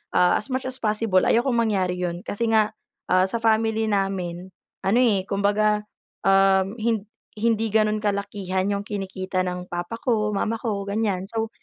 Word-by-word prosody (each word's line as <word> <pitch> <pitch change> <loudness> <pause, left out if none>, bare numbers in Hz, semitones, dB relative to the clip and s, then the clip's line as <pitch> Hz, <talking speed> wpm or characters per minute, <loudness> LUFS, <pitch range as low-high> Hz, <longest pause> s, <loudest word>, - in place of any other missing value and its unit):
ah, 180 0 +5
as 215 - -5
much 260 - -1
as 260 - -5
possible 210 -3 +1
ayokong 240 +1 +2
mangyari 195 -6 +1
yun. 175 -1 -2
Kasi 230 +1 -1
nga, 215 -1 +3 0.4
ah, 185 0 +5
sa 225 +5 -1
family 220 0 +2
namin, 190 -3 -2 0.3
ano, 210 +6 +3
eh, 210 -7 +3
kumbaga, 210 +1 +1 0.4
um, 195 +1 +4
hin 220 -2 0 0.4
hindi 225 -1 +1
ganun 215 -1 +3
kalakihan 200 -2 -1
yung 200 0 -2
kinikita 190 -2 -3
ng 180 0 -3
papa 175 +6 -4
ko, 220 -4 0
mama 225 +3 -1
ko 205 -3 -2
ganyan. 200 -2 -1
So 225 -1 -2
205 Hz, 160 wpm, -24 LUFS, 190-220 Hz, 0.4 s, ah